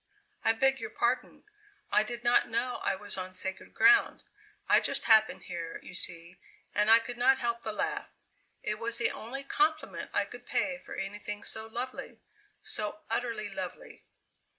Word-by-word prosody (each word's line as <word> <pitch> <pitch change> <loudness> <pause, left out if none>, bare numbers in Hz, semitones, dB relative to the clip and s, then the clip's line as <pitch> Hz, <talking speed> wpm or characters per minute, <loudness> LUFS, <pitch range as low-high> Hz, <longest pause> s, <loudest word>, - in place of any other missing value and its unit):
"I 225 - +4
beg 270 +3 +2
your 430 - -5
pardon. - - -1 0.5
I - - +5
did 240 +2 -5
not 240 0 +4
know 235 +2 -1
I - - +1
was 205 0 -1
on 185 0 -5
sacred 190 +1 -2
ground. 405 0 +5 0.4
I - - +6
just - - -1
happened 220 -1 +5
here, 170 -2 -6
you - - -10
see, 170 0 -2 0.3
and 210 +1 +2
I 225 - +10
could 235 +1 -5
not 265 +2 +5
help 235 0 -1
the 220 - -3
laugh; 210 - -2 0.6
it 210 0 -2
was 230 0 -2
the - - +2
only 265 +5 -6
compliment 310 +3 0
I - - +1
could - - -12
pay 270 -2 0
for - - -9
anything 205 +1 -5
so 220 0 -1
lovely 245 +3 -5 0.4
so 210 0 -4
utterly 230 -4 -1
lovely." 190 -2 -7
225 Hz, 170 wpm, -30 LUFS, 205-245 Hz, 0.6 s, I